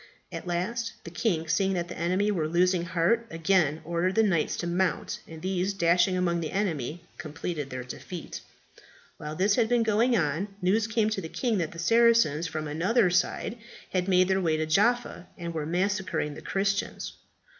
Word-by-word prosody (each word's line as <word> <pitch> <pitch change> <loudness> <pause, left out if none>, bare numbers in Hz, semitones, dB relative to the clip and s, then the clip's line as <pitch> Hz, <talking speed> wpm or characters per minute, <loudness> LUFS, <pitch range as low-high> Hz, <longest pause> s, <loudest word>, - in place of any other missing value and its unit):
At - - -7
last 230 +7 -2
the 170 - -9
king, 170 -3 -1
seeing 195 +3 +1
that 175 -2 -2
the 175 - -7
enemy 185 +5 +1
were 165 -6 0
losing 175 +1 +2
heart, 180 +7 +1
again 165 -2 +1
ordered 170 +3 0
the 225 - +5
knights 175 -7 +1
to - - -3
mount, 175 -1 -1
and 160 0 -10
these 190 +1 0
dashing 180 +1 +3
among 170 -1 +1
the 160 - -3
enemy, 170 -5 -2 0.2
completed 155 -2 -5
their 130 -1 -5
defeat. 165 +7 -8 0.8
While 150 +1 -6
this 200 +4 +2
had 230 -2 +2
been 240 -1 +3
going 225 +3 +3
on, 160 +4 0
news 205 +4 +2
came 225 -1 +1
to 200 - -2
the 160 - -7
king 230 -1 0
that 165 -3 -2
the - - -11
Saracens 225 -5 +3
from 155 -1 -4
another 180 +7 +2
side 185 +5 0 0.3
had 180 0 0
made 185 -1 +4
their 190 0 +1
way 160 -3 +1
into 155 0 -1
Jaffa, 210 +3 +1
and 170 -1 -5
were 155 -2 -3
massacring 180 -3 -1
the - - -10
Christians. 195 +1 -2
180 Hz, 185 wpm, -27 LUFS, 165-205 Hz, 0.8 s, the